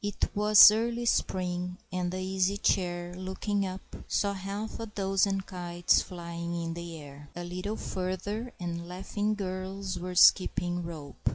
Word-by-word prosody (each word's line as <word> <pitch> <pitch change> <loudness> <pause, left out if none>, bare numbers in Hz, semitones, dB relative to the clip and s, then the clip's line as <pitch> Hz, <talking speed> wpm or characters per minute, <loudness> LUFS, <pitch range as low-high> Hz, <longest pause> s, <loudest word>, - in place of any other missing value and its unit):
It 205 -1 -1
was 210 0 +9
early 235 +2 -1
spring, 180 -4 0 0.2
and 180 -1 -1
the 185 - -4
Easy 190 +1 0
Chair, 175 -3 0
looking 190 +2 -2
up, 185 +1 -6 0.3
saw 200 -1 +1
half 200 +4 -5
a 225 - -4
dozen 195 -1 +1
kites 175 -2 +1
flying 170 -1 -5
in 165 0 -3
the 170 -1 -7
air. 145 0 -12
A 175 - -5
little 185 +5 -4
further, 195 +6 -3
and 170 -1 -4
laughing 205 +3 -2
girls 190 -1 -4
were 180 +1 -5
skipping 175 -1 +5
rope. 160 -4 -4
185 Hz, 150 wpm, -29 LUFS, 175-200 Hz, 0.3 s, was